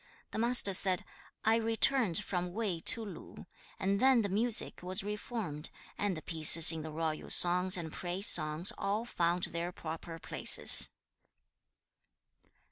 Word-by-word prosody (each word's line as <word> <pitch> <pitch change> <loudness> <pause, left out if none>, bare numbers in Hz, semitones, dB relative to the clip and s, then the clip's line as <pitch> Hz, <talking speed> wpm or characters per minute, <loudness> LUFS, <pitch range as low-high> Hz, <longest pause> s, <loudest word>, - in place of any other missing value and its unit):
The - - -8
Master 235 -4 +2
said, 185 -1 0 0.4
'I 220 +1 0
returned 225 -3 -2
from 180 -2 -7
Wei 200 -5 -5
to 225 +6 +1
Lu, 200 - -14 0.3
and 200 0 -4
then 260 -2 0
the 200 - -5
music 225 +4 -2
was 185 +3 -2
reformed, 205 -7 -9 0.3
and 200 -4 -5
the 155 - -12
pieces 160 0 +5
in 160 -1 -8
the 155 - -11
Royal 155 0 -8
songs 180 +2 +3
and 160 -3 -10
Praise 180 +2 -4
songs 155 +1 +4
all 205 +3 -5
found 175 -5 -5
their 170 +1 -6
proper 165 0 -11
places.' - - +6
185 Hz, 140 wpm, -28 LUFS, 165-215 Hz, 0.4 s, places